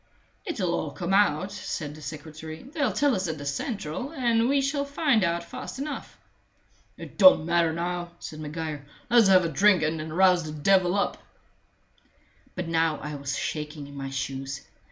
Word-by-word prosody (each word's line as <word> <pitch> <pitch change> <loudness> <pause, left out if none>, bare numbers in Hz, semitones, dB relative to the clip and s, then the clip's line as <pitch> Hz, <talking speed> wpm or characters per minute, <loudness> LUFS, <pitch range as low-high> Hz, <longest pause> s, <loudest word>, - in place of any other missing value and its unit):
"It'll 190 - -1
all 155 - -1
come 175 +6 -3
out," 195 -2 +3
said 155 -7 -5
the 155 - -12
secretary. 155 +2 -8
"They'll 285 -3 -1
tell 285 +7 +2
us 185 -1 -1
at 160 -1 -3
the 145 - -7
central, 175 - -3
and 240 -5 +2
we 280 0 +3
shall 280 +1 0
find 280 - +2
out 170 0 0
fast 255 +8 -8
enough." 285 +2 -6 0.8
"It - - -11
don't 275 - +8
matter 170 -1 +2
now," 175 +1 -3
said 155 -2 -8
Maguire. 155 -1 -5 0.3
"Let's 235 -4 +6
have 185 -2 +6
a - - +2
drink 190 +2 +4
and 155 +1 0
then 155 0 -5
rouse 180 0 +4
the 155 -1 -6
devil 185 +2 +3
up." 200 - 0 1.4
But 180 -2 -3
now 165 -1 +1
I 150 0 -6
was 140 -1 -3
shaking 150 -1 -4
in 140 0 -12
my 135 -1 -5
shoes. 135 0 -4
170 Hz, 175 wpm, -26 LUFS, 155-210 Hz, 1.4 s, don't